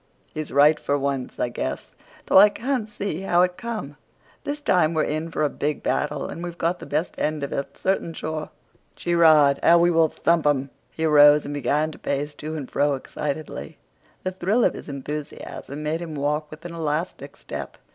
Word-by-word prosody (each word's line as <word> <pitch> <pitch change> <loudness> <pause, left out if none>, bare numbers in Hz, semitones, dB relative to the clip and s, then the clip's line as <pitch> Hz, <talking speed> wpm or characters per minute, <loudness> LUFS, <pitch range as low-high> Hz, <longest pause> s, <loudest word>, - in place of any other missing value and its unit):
"He's 155 -1 -5
right 150 +2 +5
for 145 - 0
once, 140 -2 -3
I 125 - 0
guess, 120 - -4 0.3
though - - +6
I 210 +2 +9
can't 240 0 -2
see 200 -5 -4
how 175 -2 +3
it 180 0 0
come. 215 - -6 0.5
This 290 +1 -3
time 175 - +2
we're 155 - +2
in 155 +2 -2
for 165 - -1
a - - +4
big 145 +1 -3
battle, 145 -2 -1
and 170 - -7
we've 175 -1 -6
got 170 +2 0
the - - -9
best 155 +4 -1
end 150 -1 -1
of 140 - -3
it, 140 - -4
certain 190 -3 0
sure. 155 -1 -4 0.5
Gee 175 - -2
rod! 155 -4 +6
how 170 - +6
we 175 +1 +4
will 165 -1 +4
thump 165 -1 +1
'em!" 140 -2 +1 0.2
He 160 - -3
arose 150 -1 +7
and 145 - -4
began 145 +3 0
to - - -13
pace 145 +1 -2
to 155 +2 -6
and 145 -4 -5
fro 145 0 +2
excitedly. 150 +3 -5 0.5
The 185 - -1
thrill 190 +6 +1
of - - +3
his - - -9
enthusiasm 145 +1 -6
made 155 +2 -1
him 165 -3 -6
walk 150 +1 -1
with 155 +2 -12
an 175 - -6
elastic 160 +1 -3
step. - - -7
155 Hz, 200 wpm, -24 LUFS, 145-170 Hz, 0.5 s, I